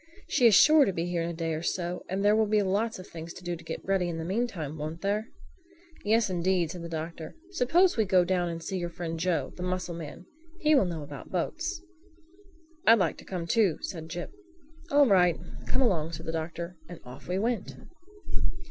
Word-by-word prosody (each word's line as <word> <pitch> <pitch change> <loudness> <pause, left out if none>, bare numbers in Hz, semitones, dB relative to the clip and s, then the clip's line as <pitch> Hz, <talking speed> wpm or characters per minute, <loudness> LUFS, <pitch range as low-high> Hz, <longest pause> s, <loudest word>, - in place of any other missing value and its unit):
"She 245 - +5
is 215 - +6
sure 310 +5 +8
to 195 - +1
be 170 -2 -2
here 175 -1 -1
in 165 - -1
a - - -4
day 165 -1 -2
or 155 - -3
so; 175 +1 -2
and 195 +2 -1
there 210 +1 +6
will 220 0 +3
be 210 0 +3
lots 205 +4 0
of 185 - -9
things 165 0 -8
to 180 - -11
do 175 0 -2
to 165 - -12
get - - -6
ready 190 -2 +1
in 165 - -3
the 160 - -4
mean 225 +8 0
time, 155 -8 -6
won't 155 +3 -5
there?" 210 +3 0 0.8
"Yes, 220 +2 +3
indeed," 180 -2 +1
said 175 - -7
the 170 - -6
Doctor. 160 0 -5 0.2
"Suppose 345 +3 +3
we 220 - +3
go 185 -2 +4
down 175 -1 +1
and 165 0 -5
see 190 +2 -3
your 175 -1 -2
friend 165 -1 -5
Joe, 175 0 0
the - - -7
mussel 180 -1 -2
man. 165 +1 -8 0.3
He 310 -2 +4
will 270 -9 +5
know 165 -4 -4
about 145 -2 -9
boats." 330 - -2 1.0
"I'd 230 +1 +9
like 180 -6 +1
to - - -13
come 180 -3 -4
too," 195 -3 +3
said 165 -4 -6
Jip. 175 +2 -5 0.6
"All 285 0 +6
right, 180 -7 +4 0.3
come 260 +1 +2
along," 165 -8 +1
said 160 +1 -6
the 160 - -2
Doctor, 170 +2 -4
and 175 - -8
off 125 +1 -11
we 180 +2 -1
went. 225 0 -1
180 Hz, 220 wpm, -28 LUFS, 165-210 Hz, 1.0 s, I'd